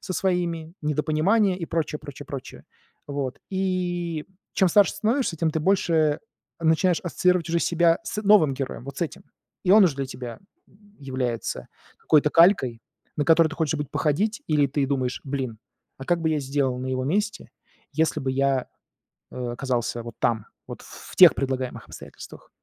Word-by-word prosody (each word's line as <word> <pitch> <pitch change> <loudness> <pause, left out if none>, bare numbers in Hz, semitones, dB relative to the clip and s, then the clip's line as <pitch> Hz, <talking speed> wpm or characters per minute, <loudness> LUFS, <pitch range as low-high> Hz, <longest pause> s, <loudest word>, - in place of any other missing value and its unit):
со 185 - -5
своими, 170 -3 -1
недопонимание 160 +7 +1
и 165 - -3
прочее 160 -2 -2
прочее 145 -1 -10
прочее. 135 -2 -8 0.4
Вот. 140 -3 -4
И, 175 -4 -2 0.3
чем 190 - +3
старше 200 +3 +4
становишься, 230 -5 0
тем 165 0 +1
ты 160 0 -2
больше 160 -4 +2 0.4
начинаешь 165 +2 +2
ассоциировать 180 -1 +1
уже 170 +1 +1
себя 170 0 +3
с 210 0 -4
новым 195 -10 +5
героем, 130 -3 -5
вот 140 -1 -8
с - - 0
этим. 165 - -5 0.4
И 185 - +2
он 205 -1 +8
уж 160 -6 +2
для 135 -1 -3
тебя 125 -3 -8 0.6
является 130 -4 -3 0.3
какой-то 150 -1 +3
калькой, 165 - +4 0.4
на 145 - 0
которую 165 -1 +5
ты 160 - -8
хочешь 160 -2 0
быть 150 -2 -4
походить, 205 +9 0
или 150 -2 +3
ты 140 0 -1
думаешь: 130 -2 -1
"Блин, 130 -5 -4 0.4
а 135 - -7
как 175 +2 +1
бы 160 -1 +1
я 155 - +1
сделал 135 -2 -1
на 130 - -4
его 130 0 -2
месте, 205 +7 -2 0.4
если 155 0 +1
бы 135 0 -1
я, 135 -1 +1 0.7
э, - - -12
оказался 120 -1 -2
вот 120 - -9
там, 110 -3 0 0.2
вот - - -8
ф - - -15 0.2
в - - -11
тех - - +8
предлагаемых 130 -2 -3
обстоятельствах?" - - -12
155 Hz, 170 wpm, -24 LUFS, 135-175 Hz, 0.7 s, он